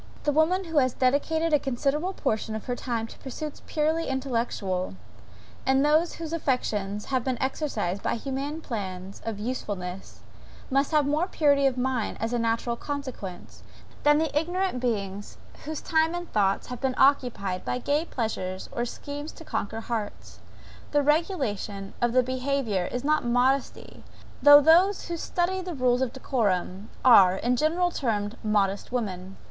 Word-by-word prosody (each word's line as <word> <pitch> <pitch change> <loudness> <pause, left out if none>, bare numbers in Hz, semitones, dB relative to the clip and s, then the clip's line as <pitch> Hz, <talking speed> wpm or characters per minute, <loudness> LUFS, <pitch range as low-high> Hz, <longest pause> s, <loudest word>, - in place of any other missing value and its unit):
The 295 - +2
woman 320 +6 +2
who 325 -4 +1
has 255 -2 +1
dedicated 315 +5 +1
a 295 - +6
considerable 285 +7 -1
portion 220 - -2
of 220 - -6
her 245 - -2
time 235 -3 -2
to - - -12
pursuits 295 +3 -6
purely 315 +2 0
intellectual, 230 - -2 0.7
and 265 +1 +3
whose 320 +1 +1
affections 210 -9 -1
have 260 -3 0
been 255 -2 -2
exercised 225 - -2
by - - 0
humane 275 +5 -4
plans 195 -7 -6
of 225 -2 -3
usefulness, 200 -5 -5 0.5
must 275 +1 +2
have 300 -3 +3
more 305 +5 +1
purity 285 -6 +3
of 260 -1 -1
mind, 250 -3 -1
as 225 +1 -2
a 240 - +1
natural 230 +1 0
consequence, 260 -10 -6 0.4
than 295 0 +5
the 315 -2 -1
ignorant 355 0 0
beings 205 -5 -3 0.3
whose 310 0 -4
time 320 +1 +1
and 350 0 -6
thoughts 195 -2 +2
have 250 -1 -6
been 265 -2 0
occupied 245 -9 +2
by - - -1
gay 285 +5 0
pleasures 190 - -3
or 240 - -2
schemes 290 +5 -6
to 325 - -12
conquer 220 -3 -3
hearts. 220 -3 -5 0.5
The 290 -1 +4
regulation 265 - -1
of 240 -1 +2
the 255 0 +5
behaviour 255 -6 -1
is 245 +1 -3
not 305 +1 +2
modesty, 250 +3 0 0.4
though 290 0 +10
those 350 +6 +4
who 340 - -1
study 360 +3 -1
rules 255 -9 0
of 260 -3 0
decorum, 205 -7 -1 0.2
are, 190 -7 +8
in 240 +6 +1
general 335 +6 +1
termed 215 -7 -1
modest 205 -1 0
women. 195 -6 -3
255 Hz, 155 wpm, -26 LUFS, 220-300 Hz, 0.7 s, though